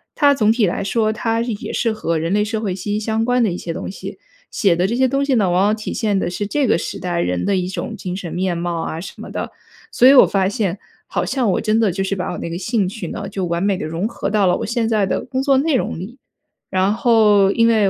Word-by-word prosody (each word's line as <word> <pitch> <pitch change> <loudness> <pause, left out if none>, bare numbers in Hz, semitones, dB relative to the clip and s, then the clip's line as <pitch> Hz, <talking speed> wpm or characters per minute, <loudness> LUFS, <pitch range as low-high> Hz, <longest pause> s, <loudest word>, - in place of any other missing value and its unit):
它 285 -1 +5
总 220 -6 +3
体 225 -1 +2
来 185 +2 -1
说， 215 +2 +1
它 225 +1 -1
也 230 -3 -4
是 230 - 0
和 170 -6 -1
人 165 +3 -1
类 210 0 +3
社 220 +1 -2
会 205 -4 -2
息 200 +2 -4
息 210 - 0
相 220 +1 -1
关 245 0 +2
的 210 - +1
一 175 - -3
些 170 - -5
东 - - -5
西。 - - -8 0.4
写 195 -5 +3
的 175 +2 +1
这 220 +5 0
些 260 +1 +3
东 275 +2 0
西 280 - +1
呢， 200 -6 +2
往 180 +2 +2
往 210 +2 +3
体 215 - -6
现 210 -3 0
的 175 - -1
是 190 +4 -3
这 275 +5 0
个 - - +3
时 - - -5
代 175 -1 -2
人 90 - -1
的 200 - +1
一 180 -1 -1
种 205 +4 -5
精 180 -3 -5
神 185 -3 -6
面 180 -1 -1
貌 170 -1 -2
啊 160 0 -4
什 190 - -8
么 - - -8
的。 - - -4 0.4
所 250 - +5
以 270 - +8
我 265 - +8
发 190 -2 +1
现 200 -3 -1 0.3
好 - - -1
像 250 -6 0
我 - - 0
真 220 +1 +1
的 215 -4 +2
就 195 +2 -2
是 195 +1 -1
把 180 - -3
我 - - -5
那 - - -5
个 170 - -4
兴 205 -1 0
趣 195 -2 -6
呢， 200 +4 -5
就 195 -2 -3
完 170 +1 -1
美 200 -1 +1
地 - - -4
融 165 +6 -2
合 210 - -4
到 210 -1 +2
了 180 - +3
我 - - -4
现 230 0 -1
在 215 -3 +1
的 - - -2
工 260 0 -2
作 275 -1 +3
内 295 +2 +2
容 - - -1
里。 235 +9 -9 0.5
然 190 +2 +1
后， 215 -4 +4
因 230 +2 +3
为 215 -4 +3
205 Hz, 305 characters per minute, -19 LUFS, 185-230 Hz, 0.5 s, 以